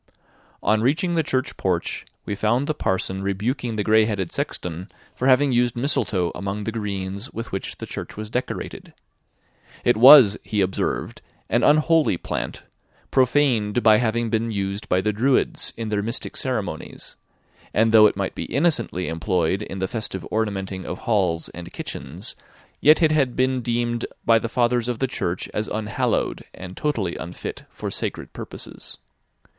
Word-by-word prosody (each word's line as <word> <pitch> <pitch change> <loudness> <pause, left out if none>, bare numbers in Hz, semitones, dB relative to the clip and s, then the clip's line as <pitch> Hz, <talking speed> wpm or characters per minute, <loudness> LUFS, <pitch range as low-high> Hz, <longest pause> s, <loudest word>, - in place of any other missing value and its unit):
On 110 0 +3
reaching 160 - +1
the 165 - +3
church 130 -3 -2
porch, 90 -3 -1 0.2
we - - -3
found 115 +6 +1
the 155 - 0
parson 95 -6 -1
rebuking 110 +5 -2
the 105 - 0
gray 110 +1 +5
headed 100 -6 -2
sexton 90 +3 -4 0.2
for 130 - -1
having 135 +1 +5
used 120 -1 +2
mistletoe 110 - 0
among 100 +1 -4
the 115 - -2
greens 100 0 -4
with 115 +2 -6
which 95 - -4
the - - -6
church - - -7
was 110 0 -6
decorated. 125 +1 -4 0.9
It 120 - +4
was, 125 -4 +9
he 105 - -2
observed, 95 -1 -1 0.3
an - - +2
unholy 155 - +4
plant, - - -4 0.5
profaned 125 -5 +2
by 110 -1 +7
having 115 -1 0
been 115 +1 0
used 100 +1 -3
by 90 - +3
the 105 +2 0
Druids 125 +6 +1
in 115 -1 -4
their 105 -1 0
mystic 115 +4 -2
ceremonies; - - -4 0.6
and 110 +1 +3
though 110 -1 +8
it 100 - -2
might 100 -1 -2
be - - -5
innocently 135 - 0
employed 90 +2 0
in 95 - -6
the 95 0 -1
festive 105 -6 -4
ornamenting 95 -4 -2
of 90 - -5
halls 95 -7 0
and 85 0 -9
kitchens, 80 - -5 0.4
yet 155 +3 +6
it 155 - +5
had 140 -5 +2
been 130 0 +1
deemed 120 0 -1 0.2
by 115 -1 +5
the 115 - -4
Fathers 120 0 +1
of 120 -2 -1
the 135 - 0
Church 90 -7 -2
as 105 - -1
unhallowed, 105 -1 -1
and 90 0 -9
totally 110 - -1
unfit 90 - -7
for - - -6
sacred - - -4
purposes. - - -8
110 Hz, 160 wpm, -23 LUFS, 95-125 Hz, 0.9 s, was